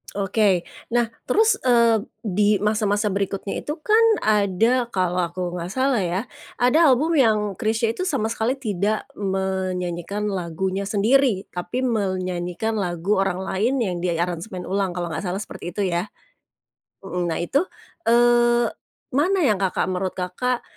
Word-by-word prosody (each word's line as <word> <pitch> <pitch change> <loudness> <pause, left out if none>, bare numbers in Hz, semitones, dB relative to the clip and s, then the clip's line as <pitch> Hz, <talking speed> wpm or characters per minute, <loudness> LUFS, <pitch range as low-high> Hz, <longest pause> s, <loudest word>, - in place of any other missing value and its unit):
Oke. 195 -2 +1 0.3
Nah, 240 0 +2 0.2
terus, 440 +2 +3
eee, 235 -4 +4 0.2
di 205 -1 +2
masa-masa 210 0 +1
berikutnya 195 0 -2
itu 295 +2 -4
kan 435 +7 +4 0.2
ada 215 +4 +2
kalau 180 -2 0
aku 180 0 -4
nggak 175 0 -5
salah 260 0 +1
ya, 185 +6 -2 0.3
ada 280 +5 +5
album 310 +7 +2
yang 215 -7 +2
Chrisye 220 +3 0
itu 365 - -3
sama 275 - 0
sekali 230 +4 -1
tidak 210 -3 -1
menyanyikan 190 0 -2
lagunya 190 0 -2
sendiri, 210 +1 +2
tapi 180 +8 -3
menyanyikan 185 -3 -1
lagu 180 0 0
orang 190 -2 -2
lain 210 +8 0
yang 195 -7 -1
diaransemen 175 +2 -2
ulang, 195 -1 0
kalau 175 0 -3
nggak 160 -1 -4
salah 185 0 -2
seperti 175 -4 -7
itu 205 - -3
ya. 175 +3 -2 0.9
Mhm, 180 -2 -3
nah 165 - -1
itu, 280 - +1 0.4
eee, 240 0 +4 0.4
mana 340 +9 +2
yang 215 -9 +3
Kakak 190 -1 0
menurut 185 0 -2
Kakak, 215 +8 -2
205 Hz, 140 wpm, -23 LUFS, 185-240 Hz, 0.9 s, ada